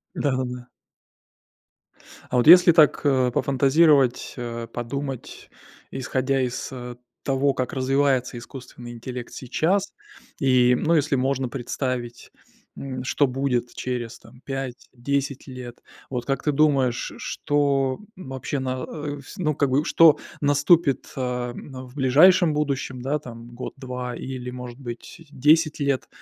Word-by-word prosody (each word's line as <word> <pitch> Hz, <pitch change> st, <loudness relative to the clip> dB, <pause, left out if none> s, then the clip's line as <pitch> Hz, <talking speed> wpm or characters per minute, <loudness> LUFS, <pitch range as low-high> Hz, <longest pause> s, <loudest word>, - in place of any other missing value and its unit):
Да-да-да. 125 Hz, -3 st, -2 dB, 1.6 s
А -, -, 0 dB
вот 120 Hz, -, +2 dB
если 175 Hz, +1 st, +9 dB
так, 155 Hz, -3 st, +5 dB
э, 130 Hz, -3 st, +2 dB
пофантазировать, 140 Hz, 0 st, +3 dB
э, 115 Hz, -1 st, -5 dB
подумать, 130 Hz, +2 st, -6 dB, 0.4 s
исходя 130 Hz, +1 st, -1 dB
из, 125 Hz, -1 st, -3 dB
э, 125 Hz, -2 st, -7 dB, 0.3 s
того, 135 Hz, 0 st, +1 dB
как 130 Hz, -1 st, -3 dB
развивается 130 Hz, -1 st, +1 dB
искусственный 120 Hz, 0 st, -10 dB
интеллект 120 Hz, +1 st, -7 dB
сейчас. 180 Hz, +10 st, -1 dB, 0.5 s
И, 125 Hz, -2 st, +4 dB
ну, 165 Hz, +6 st, +1 dB
если 145 Hz, -2 st, +2 dB
можно 135 Hz, 0 st, 0 dB
представить, 120 Hz, -1 st, -4 dB, 0.5 s
м, 130 Hz, -2 st, -5 dB
что 145 Hz, +2 st, +2 dB
будет 125 Hz, -2 st, -1 dB
через, 120 Hz, -2 st, -4 dB
там, 120 Hz, +3 st, -18 dB
5, 135 Hz, -2 st, -6 dB
10 140 Hz, +2 st, -2 dB
лет, 125 Hz, -2 st, -9 dB, 0.3 s
вот 125 Hz, -2 st, -3 dB
как 135 Hz, -1 st, -2 dB
ты 150 Hz, -, +2 dB
думаешь, 140 Hz, -4 st, +3 dB
ш -, -, -5 dB
что 140 Hz, -2 st, 0 dB, 0.2 s
вообще 135 Hz, -, -5 dB
на 130 Hz, -1 st, -3 dB
э, 145 Hz, -1 st, -5 dB, 0.2 s
ну 155 Hz, -5 st, 0 dB
как 140 Hz, -1 st, +1 dB
бы, 140 Hz, +3 st, +2 dB
что 165 Hz, -3 st, +6 dB, 0.2 s
наступит, 145 Hz, 0 st, +3 dB
э, -, -, -6 dB
м, 125 Hz, +1 st, -5 dB
в 125 Hz, -, -17 dB
ближайшем 155 Hz, +6 st, +5 dB
будущем, 140 Hz, -4 st, -2 dB
да, 140 Hz, +4 st, 0 dB
там 120 Hz, -4 st, -11 dB
1-2 125 Hz, -1 st, -6 dB
или, 125 Hz, -1 st, -6 dB
может 125 Hz, 0 st, -8 dB
быть, 125 Hz, +6 st, -9 dB
10 155 Hz, +3 st, +3 dB
лет. 140 Hz, -2 st, 0 dB
130 Hz, 135 wpm, -24 LUFS, 125-145 Hz, 1.6 s, если